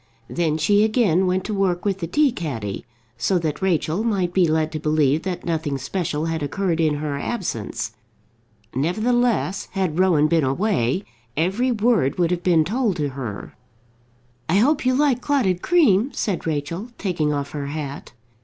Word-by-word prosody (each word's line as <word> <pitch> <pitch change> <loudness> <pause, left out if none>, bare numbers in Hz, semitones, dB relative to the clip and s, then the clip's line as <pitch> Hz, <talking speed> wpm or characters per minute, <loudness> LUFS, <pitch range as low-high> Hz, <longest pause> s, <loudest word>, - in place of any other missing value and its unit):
Then 160 -3 0
she 205 +6 +3
again 215 -5 +2
went 185 +1 0
to 215 - -4
work 190 -3 0
with 195 -2 0
the 170 - -3
tea 290 - +3
caddy, 115 - -5 0.3
so 190 - +2
that 160 -2 -2
Rachel 180 +1 0
might 190 -6 0
be 180 -2 +4
led 155 0 +1
to 155 - -4
believe 150 -1 +2
that 185 -1 -4
nothing 160 -4 -1
special 155 +2 -2
had 165 -1 -2
occurred 165 +3 -1
in 155 -2 +2
her 145 -1 -3
absence. 165 - -3 0.8
Nevertheless, 215 - 0
had 185 -4 -1
Rowan 170 -5 +4
been 165 -1 +2
away, 140 - 0 0.3
every 195 - +1
word 215 - +2
would 175 -1 +2
have 175 -1 0
been 170 -4 +3
told 225 0 0
to 150 -4 -1
her. 125 -7 -6 1.0
"I 170 - +3
hope 265 +6 +3
you 255 - +3
like 275 -3 +2
clotted 235 -12 +1
cream," 270 - +3
said 190 -5 -2
Rachel, 160 - -3
taking 165 -6 -1
off 140 -1 -3
her 145 -2 -4
hat. 145 -1 -6
175 Hz, 165 wpm, -22 LUFS, 150-205 Hz, 1.0 s, be